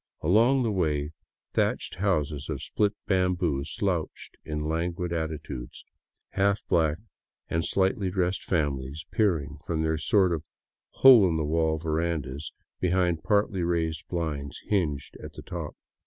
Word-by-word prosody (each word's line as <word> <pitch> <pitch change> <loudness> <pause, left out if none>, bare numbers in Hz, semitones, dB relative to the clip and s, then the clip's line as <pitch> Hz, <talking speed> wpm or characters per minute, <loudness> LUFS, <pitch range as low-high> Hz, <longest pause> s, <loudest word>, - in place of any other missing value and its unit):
Along 115 - +4
the 115 - 0
way, 75 -6 0 0.4
thatched - - 0
houses 75 -7 0
of 70 -4 -3
split 105 -1 0
bamboo 90 -6 +1
slouched 90 -1 -3
in 75 0 -3
languid 85 +2 -2
attitudes, 80 -6 -5 0.5
half 100 +1 +1
black 80 -2 +2 0.5
and 80 0 +1
slightly 95 +1 +1
dressed 90 0 -1
families 75 -2 -2
peering 75 -9 0
from 80 -2 -1
their 80 0 0
sort 90 +3 +3
of 80 -2 -3 0.5
hole 125 -7 +7
in 80 - 0
the 80 - 0
wall 80 +1 +1
verandas 80 -3 -2 0.3
behind 90 -2 +1
partly 100 -3 +1
raised 80 -2 -1
blinds 75 -5 -3
hinged 75 -9 -1
at - - -8
the - - -10
top. - - -6
85 Hz, 135 wpm, -27 LUFS, 75-95 Hz, 0.5 s, hole